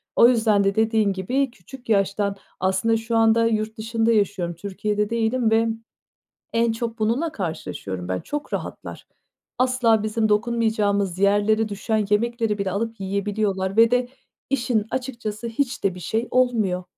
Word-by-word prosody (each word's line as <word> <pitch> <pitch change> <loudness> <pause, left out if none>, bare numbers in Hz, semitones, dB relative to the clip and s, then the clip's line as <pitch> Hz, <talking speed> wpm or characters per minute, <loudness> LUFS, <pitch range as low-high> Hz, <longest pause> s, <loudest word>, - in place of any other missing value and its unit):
O 235 - +7
yüzden 220 -4 +3
de 195 0 +1
dediğin 220 -2 +2
gibi, 250 +8 -1
küçük 240 +4 -14
yaştan 200 -1 +1 0.2
aslında 190 +5 +1
şu 225 +1 -1
anda 225 0 +4
yurt 220 -1 -1
dışında 225 +1 0
yaşıyorum, 195 -5 0
Türkiye'de 205 +3 -2
değilim 230 0 +1
ve 225 +1 +3 0.9
en 230 0 +2
çok 230 0 -4
bununla 240 +10 0
karşılaşıyorum 100 - -5
ben 95 0 -1
çok 295 0 -5
rahatlar. - - -6 0.5
Asla 250 -4 +3
bizim 215 0 0
dokunmayacağımız 210 -4 +1
yerlere 205 +2 +3
düşen 215 +1 -1
yemekleri 225 0 +1
bile 195 -1 -1
alıp 225 +3 -3
yiyebiliyorlar 195 0 -1
ve 230 0 +6
de 245 0 +1 0.4
işin 235 -5 0
açıkçası 235 -4 -4
hiç 245 +1 -2
de 195 -2 +2
bir 180 - -9
şey 225 +6 -2
olmuyor. 220 -8 +1
220 Hz, 145 wpm, -23 LUFS, 200-230 Hz, 0.9 s, O